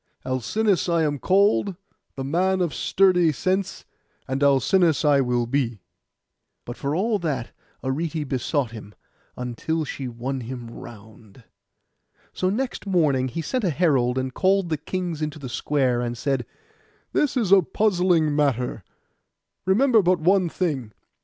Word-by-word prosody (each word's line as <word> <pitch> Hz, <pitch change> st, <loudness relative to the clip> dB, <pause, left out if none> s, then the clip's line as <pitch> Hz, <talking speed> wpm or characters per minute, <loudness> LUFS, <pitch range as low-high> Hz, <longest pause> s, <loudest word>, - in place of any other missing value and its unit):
Alcinous 180 Hz, -, 0 dB
I 170 Hz, -1 st, +2 dB
am 145 Hz, -2 st, -1 dB
called, 200 Hz, -, +2 dB, 0.4 s
the 135 Hz, -, -4 dB
man 185 Hz, +7 st, +1 dB
of 175 Hz, -5 st, 0 dB
sturdy 180 Hz, +1 st, +3 dB
sense; 185 Hz, +6 st, -2 dB, 0.4 s
and 135 Hz, +1 st, -2 dB
Alcinous 145 Hz, +4 st, +3 dB
I 145 Hz, -2 st, +5 dB
will 125 Hz, -2 st, 0 dB
be.' 120 Hz, -6 st, -2 dB, 0.8 s
But 120 Hz, -, -6 dB
for 140 Hz, +3 st, -2 dB
all 210 Hz, +4 st, +1 dB
that 140 Hz, -9 st, -3 dB, 0.3 s
Arete 150 Hz, +3 st, -2 dB
besought 130 Hz, -1 st, -1 dB
him, 105 Hz, -2 st, -11 dB, 0.4 s
until 125 Hz, +6 st, -2 dB
she 135 Hz, -2 st, -5 dB
won 125 Hz, +3 st, -4 dB
him 120 Hz, -1 st, -7 dB
round. 110 Hz, 0 st, -13 dB, 0.9 s
So 185 Hz, -, 0 dB
next 245 Hz, +1 st, -3 dB
morning 150 Hz, -9 st, +2 dB
he 165 Hz, +6 st, -4 dB
sent 255 Hz, -, -2 dB
a 185 Hz, -, +2 dB
herald, 135 Hz, -6 st, +2 dB
and 130 Hz, 0 st, -2 dB
called 190 Hz, +1 st, +2 dB
the 155 Hz, -, 0 dB
kings 175 Hz, +1 st, -4 dB
into 155 Hz, -1 st, -3 dB
the 140 Hz, -3 st, -7 dB
square, 130 Hz, -1 st, 0 dB
and 120 Hz, 0 st, -3 dB
said, 135 Hz, -1 st, -1 dB, 0.7 s
'This 285 Hz, -3 st, +1 dB
is 215 Hz, -7 st, 0 dB
a 200 Hz, -1 st, +8 dB
puzzling 180 Hz, -5 st, +1 dB
matter: 125 Hz, -7 st, 0 dB, 0.8 s
remember 225 Hz, +4 st, +4 dB
but 180 Hz, -1 st, +2 dB
one 180 Hz, +2 st, +3 dB
thing. 140 Hz, -, -2 dB
150 Hz, 145 wpm, -24 LUFS, 130-185 Hz, 0.9 s, a